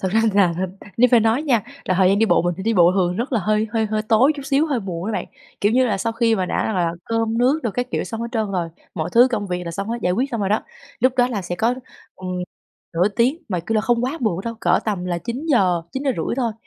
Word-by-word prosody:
thật 190 Hz, -, -1 dB
ra 220 Hz, -, +4 dB
là 180 Hz, -4 st, +4 dB, 0.4 s
nếu 250 Hz, +2 st, +5 dB
phải 240 Hz, -2 st, +6 dB
nói 225 Hz, +6 st, +2 dB
nha, 245 Hz, -9 st, +2 dB, 0.2 s
là 185 Hz, -, 0 dB
thời 185 Hz, 0 st, +4 dB
gian 200 Hz, +1 st, +3 dB
đi 225 Hz, -, +3 dB
bộ -, -, +3 dB
mình 175 Hz, -1 st, 0 dB
phải 190 Hz, -, -7 dB
đi 225 Hz, +1 st, +1 dB
bộ 175 Hz, -1 st, +5 dB
thường 180 Hz, -2 st, +1 dB
rất 250 Hz, +3 st, -3 dB
là 225 Hz, -, +2 dB
hơi 215 Hz, +2 st, +1 dB
hơi 220 Hz, -1 st, +1 dB
hơi 215 Hz, 0 st, -1 dB
tối 230 Hz, +7 st, +4 dB
chút 280 Hz, -, -6 dB
xíu, 285 Hz, +3 st, +2 dB
hơi 270 Hz, -6 st, -1 dB
muộn 180 Hz, -1 st, -5 dB
á 225 Hz, -, -2 dB
bạn. -, -, -2 dB, 0.4 s
Kiểu 205 Hz, +2 st, +2 dB
như 255 Hz, 0 st, +4 dB
là, 210 Hz, -, 0 dB
sau 225 Hz, +3 st, -1 dB
khi 230 Hz, -1 st, +2 dB
mà 185 Hz, -3 st, -1 dB
đã -, -, -1 dB
rằng 215 Hz, -, -1 dB
là 170 Hz, -2 st, +1 dB
cơm 225 Hz, 0 st, -1 dB
nước 265 Hz, +6 st, +3 dB
đồ 230 Hz, -, -1 dB
các 245 Hz, +4 st, -3 dB
kiểu -, -, -1 dB
xong 225 Hz, -1 st, -6 dB
hết 235 Hz, -, -3 dB
trơn 220 Hz, -3 st, -1 dB
rồi, 175 Hz, -3 st, -1 dB, 0.3 s
mọi 170 Hz, 0 st, -3 dB
thứ 245 Hz, +2 st, +6 dB
công 210 Hz, -4 st, -2 dB
việc 180 Hz, -1 st, -3 dB
là 170 Hz, -, -4 dB
xong 195 Hz, +5 st, -4 dB
hết, 235 Hz, +1 st, -2 dB
giải 180 Hz, -, +2 dB
quyết 255 Hz, +8 st, -1 dB
xong 230 Hz, -3 st, -2 dB
rồi 195 Hz, -, 0 dB
đó, 215 Hz, -, +1 dB, 0.4 s
lúc 255 Hz, 0 st, +4 dB
đó 245 Hz, 0 st, +4 dB
là 210 Hz, -6 st, -3 dB
sẽ 175 Hz, 0 st, -4 dB
có, 230 Hz, +5 st, +1 dB, 0.4 s
ừm, 185 Hz, -1 st, -7 dB, 0.6 s
nửa 180 Hz, +5 st, +3 dB
tiếng, 245 Hz, -, 0 dB
mà, 180 Hz, -4 st, -1 dB
kiểu 220 Hz, +6 st, -3 dB
là, 215 Hz, -, +3 dB
không 240 Hz, +1 st, +1 dB
quá 295 Hz, +6 st, -3 dB
muộn 195 Hz, -6 st, 0 dB
đâu, 230 Hz, 0 st, -3 dB
cỡ 175 Hz, +1 st, +3 dB
tầm 200 Hz, -5 st, -2 dB
là 175 Hz, -1 st, -2 dB
9:00-9:30 240 Hz, -, -1 dB
thôi, 235 Hz, -4 st, 0 dB
220 Hz, 285 wpm, -21 LUFS, 185-240 Hz, 0.6 s, phải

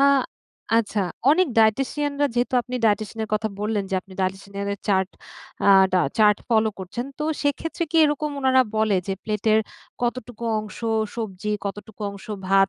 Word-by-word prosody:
আ 275 Hz, -, +6 dB, 0.7 s
আচ্ছা 215 Hz, -2 st, 0 dB, 0.3 s
অনেক 365 Hz, +4 st, +4 dB
dietitian 270 Hz, +6 st, +2 dB
রা 290 Hz, -, +5 dB
যেহেতু 245 Hz, +1 st, 0 dB
আপনি 250 Hz, +1 st, -7 dB
dietitian 215 Hz, +1 st, +1 dB
এর -, -, -10 dB
কথা 220 Hz, +1 st, 0 dB
বললেন, 210 Hz, -1 st, 0 dB
যে -, -, 0 dB
আপনি 190 Hz, +1 st, -17 dB
dietitian 195 Hz, +1 st, -3 dB
এর 200 Hz, -, -2 dB, 0.2 s
চার্ট 190 Hz, -1 st, +2 dB, 0.5 s
আ -, -, +4 dB, 0.2 s
টা 185 Hz, -, +4 dB, 0.2 s
চার্ট 210 Hz, -1 st, +6 dB
ফলো 220 Hz, -1 st, +3 dB
করছেন। 215 Hz, +7 st, -5 dB
তো 300 Hz, -, -2 dB, 0.2 s
সেক্ষেত্রে 305 Hz, +4 st, -1 dB
কি 330 Hz, -, 0 dB
এরকম 295 Hz, 0 st, 0 dB
ওনারা 260 Hz, -1 st, +5 dB
বলে 215 Hz, -3 st, +3 dB
যে 195 Hz, -, -1 dB
প্লেটের 215 Hz, 0 st, +2 dB, 0.4 s
কতটুকু 240 Hz, -1 st, -3 dB, 0.2 s
অংশ 215 Hz, 0 st, -9 dB, 0.4 s
সবজি, 210 Hz, -2 st, -4 dB, 0.2 s
কতটুকু 205 Hz, +2 st, -7 dB
অংশ 200 Hz, -1 st, -11 dB, 0.2 s
ভাত, 195 Hz, 0 st, +4 dB
220 Hz, 165 wpm, -24 LUFS, 200-255 Hz, 0.7 s, আ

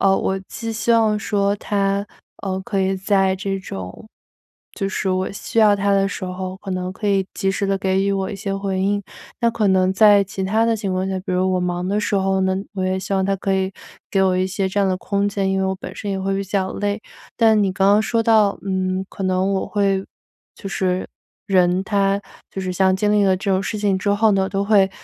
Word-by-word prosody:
呃， 195 Hz, -1 st, +4 dB
我 190 Hz, -, -1 dB
既 230 Hz, -3 st, -5 dB
希 220 Hz, +1 st, -1 dB
望 220 Hz, -2 st, +3 dB
说 200 Hz, -1 st, 0 dB
他， 200 Hz, 0 st, -1 dB, 0.4 s
呃， 190 Hz, -1 st, -2 dB
可 195 Hz, -1 st, -2 dB
以 190 Hz, 0 st, +1 dB
在 190 Hz, -1 st, +2 dB
这 195 Hz, +1 st, -3 dB
种 95 Hz, -, -8 dB, 0.7 s
就 195 Hz, -, -2 dB
是 195 Hz, -, -2 dB
我 185 Hz, +1 st, -1 dB
需 200 Hz, -, -4 dB
要 215 Hz, -2 st, +6 dB
他 200 Hz, 0 st, 0 dB
的 195 Hz, 0 st, +3 dB
时 200 Hz, -, -5 dB
候， 185 Hz, 0 st, -5 dB
可 195 Hz, -, -8 dB
能 185 Hz, 0 st, -3 dB
可 205 Hz, +2 st, -3 dB
以 195 Hz, -1 st, +2 dB
及 195 Hz, -, -1 dB
时 200 Hz, +1 st, -1 dB
的 195 Hz, 0 st, 0 dB
给 190 Hz, 0 st, +1 dB
予 200 Hz, 0 st, +1 dB
我 195 Hz, -1 st, -1 dB
一 200 Hz, -, -5 dB
些 195 Hz, -1 st, -3 dB
回 195 Hz, -1 st, -2 dB
应。 200 Hz, +1 st, 0 dB, 0.4 s
那 235 Hz, -1 st, +3 dB
可 220 Hz, -3 st, 0 dB
能 185 Hz, -1 st, +3 dB
在 205 Hz, 0 st, +6 dB
其 195 Hz, 0 st, -5 dB
它 220 Hz, +4 st, +2 dB
的 230 Hz, -1 st, +2 dB
情 200 Hz, -3 st, -3 dB
况 185 Hz, +1 st, -1 dB
下， 190 Hz, -1 st, -2 dB
比 185 Hz, -, -5 dB
如 185 Hz, +1 st, +1 dB
我 -, -, +1 dB
忙 180 Hz, 0 st, -2 dB
的 205 Hz, +2 st, +1 dB
时 210 Hz, -, -1 dB
候 190 Hz, -1 st, +1 dB
呢， 190 Hz, 0 st, +1 dB, 0.2 s
我 190 Hz, -1 st, -2 dB
也 185 Hz, 0 st, 0 dB
希 190 Hz, +1 st, -3 dB
望 190 Hz, 0 st, +1 dB
他 195 Hz, +1 st, +1 dB
可 195 Hz, 0 st, -1 dB
以 190 Hz, 0 st, -1 dB, 0.4 s
给 195 Hz, -, +2 dB
我 185 Hz, -1 st, +2 dB
一 185 Hz, 0 st, +1 dB
些 190 Hz, 0 st, -1 dB
这 190 Hz, -, -3 dB
样 200 Hz, -, +3 dB
的 185 Hz, -, +1 dB
空 200 Hz, +1 st, -1 dB
间， 195 Hz, -1 st, -1 dB
因 190 Hz, -, 0 dB
为 -, -, +1 dB
我 190 Hz, -, -1 dB
本 -, -, -9 dB
身 205 Hz, -, -4 dB
也 195 Hz, -1 st, -2 dB
会 195 Hz, 0 st, -1 dB
比 195 Hz, -, -2 dB
较 190 Hz, 0 st, -1 dB
累。 205 Hz, +1 st, -2 dB, 0.4 s
但 220 Hz, -2 st, +5 dB
你 195 Hz, -2 st, +1 dB
刚 195 Hz, +1 st, +2 dB
刚 205 Hz, +2 st, +5 dB
说 230 Hz, +1 st, 0 dB
到， 215 Hz, -3 st, +3 dB
嗯， 185 Hz, -1 st, -1 dB
可 -, -, -8 dB
能 185 Hz, +1 st, +1 dB
我 190 Hz, -, -1 dB
会 195 Hz, -2 st, 0 dB, 0.5 s
就 195 Hz, -, -8 dB
是 185 Hz, -1 st, -1 dB, 0.4 s
人 185 Hz, -2 st, +3 dB
他 200 Hz, 0 st, +1 dB, 0.3 s
就 195 Hz, -, -5 dB
是 185 Hz, -1 st, -3 dB
像 190 Hz, +1 st, +3 dB
经 205 Hz, +2 st, +1 dB
历 205 Hz, -1 st, +4 dB
了 190 Hz, -1 st, +4 dB
这 195 Hz, +2 st, -2 dB
种 190 Hz, 0 st, +2 dB
事 215 Hz, +2 st, -3 dB
情 200 Hz, -2 st, +1 dB
之 200 Hz, +2 st, -1 dB
后 215 Hz, +2 st, +3 dB
呢， 195 Hz, -1 st, +2 dB
都 195 Hz, 0 st, 0 dB
会 200 Hz, -2 st, +4 dB
195 Hz, 265 characters per minute, -21 LUFS, 190-205 Hz, 0.7 s, 要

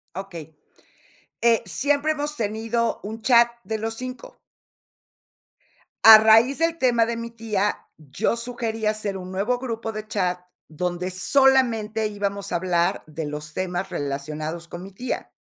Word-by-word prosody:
Okey. 170 Hz, -5 st, -8 dB, 0.9 s
Eh, 230 Hz, -1 st, +3 dB
siempre 290 Hz, +2 st, +1 dB
hemos 300 Hz, 0 st, -4 dB
tenido 225 Hz, +1 st, -1 dB
un 220 Hz, +2 st, -7 dB
chat 235 Hz, -1 st, +6 dB, 0.2 s
de 220 Hz, 0 st, -3 dB
los 225 Hz, +1 st, -3 dB
5. 255 Hz, -, -8 dB, 1.7 s
A 220 Hz, -1 st, +12 dB
raíz 225 Hz, +6 st, +5 dB
del 330 Hz, 0 st, +1 dB
tema 240 Hz, -5 st, +3 dB
de 230 Hz, 0 st, -3 dB
mi 230 Hz, 0 st, -5 dB
tía, 215 Hz, -3 st, -2 dB
yo 155 Hz, -, -2 dB
sugerí 230 Hz, -2 st, -3 dB
hacer 215 Hz, -2 st, -1 dB
un 185 Hz, 0 st, -8 dB
nuevo 215 Hz, +6 st, 0 dB
grupo 230 Hz, -3 st, -4 dB
de 215 Hz, 0 st, -7 dB
chat, 180 Hz, -4 st, -1 dB, 0.3 s
donde 180 Hz, +3 st, -3 dB
solamente 225 Hz, 0 st, +2 dB
íbamos 200 Hz, -1 st, -4 dB
a -, -, 0 dB
hablar 175 Hz, -1 st, 0 dB
de 155 Hz, 0 st, -6 dB
los 150 Hz, +1 st, -6 dB
temas 185 Hz, +1 st, -3 dB
relacionados 155 Hz, +2 st, -4 dB
con 175 Hz, -, -7 dB
mi 195 Hz, +1 st, -10 dB
tía 245 Hz, +6 st, -5 dB
215 Hz, 145 wpm, -23 LUFS, 180-235 Hz, 1.7 s, A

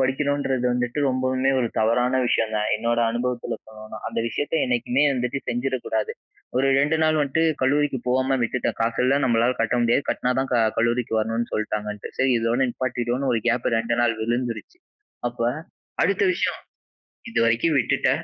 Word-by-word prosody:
படிக்கணுன்றது 135 Hz, -1 st, 0 dB
வந்துட்டு 125 Hz, +2 st, -2 dB
ரொம்பவுமே 130 Hz, +1 st, +1 dB
ஒரு 120 Hz, -2 st, 0 dB
தவறான 125 Hz, +4 st, +2 dB
விஷயம்தான், 110 Hz, -2 st, 0 dB
என்னோட 115 Hz, +2 st, 0 dB
அனுபவத்துல 120 Hz, +1 st, -2 dB
சொல்லணும்னா. 110 Hz, 0 st, -10 dB
அந்த -, -, -4 dB
விஷயத்தை 145 Hz, +7 st, -1 dB
என்னைக்குமே 125 Hz, +3 st, +1 dB
வந்துட்டு 125 Hz, +2 st, -1 dB
செஞ்சிடக்கூடாது. 120 Hz, -3 st, -1 dB, 0.4 s
ஒரு 135 Hz, +1 st, +3 dB
2 145 Hz, +3 st, +2 dB
நாள் 155 Hz, 0 st, +3 dB
வந்துட்டு 145 Hz, +3 st, +1 dB, 0.2 s
கல்லூரிக்கு 140 Hz, 0 st, +2 dB
போகாம 130 Hz, +1 st, +2 dB
விட்டுட்டேன். 125 Hz, +2 st, -1 dB
காசு 115 Hz, +1 st, 0 dB
இல்ல 135 Hz, +2 st, +3 dB
நம்மளால 120 Hz, +1 st, +2 dB
கட்ட 115 Hz, +2 st, +1 dB
முடியாது, 120 Hz, +4 st, +2 dB
கட்டுனா 125 Hz, -, 0 dB
தான் 135 Hz, -, -3 dB
க 125 Hz, -, +3 dB, 0.2 s
கல்லூரிக்கு 115 Hz, -1 st, +1 dB
வரணுன்னு 115 Hz, +2 st, -1 dB
சொல்லிட்டாங்கன்ட்டு. 105 Hz, -1 st, -3 dB
சரி 130 Hz, 0 st, +3 dB
இதோட 115 Hz, +3 st, 0 dB
நிப்பாட்டிடுவோனு 125 Hz, +1 st, -2 dB
ஒரு 115 Hz, -, +1 dB
கேப் 120 Hz, +1 st, 0 dB
2 115 Hz, +1 st, -1 dB
நாள் 120 Hz, -1 st, +2 dB
விழுந்துருச்சு. 120 Hz, -, -3 dB, 0.5 s
அப்ப 120 Hz, -, -14 dB, 0.6 s
அடுத்த -, -, +2 dB
விஷயம் -, -, -1 dB, 0.7 s
"இதுவரைக்கும் 120 Hz, -, +2 dB
விட்டுட்ட, 120 Hz, -, +1 dB
125 Hz, 150 wpm, -23 LUFS, 115-130 Hz, 0.7 s, ஒரு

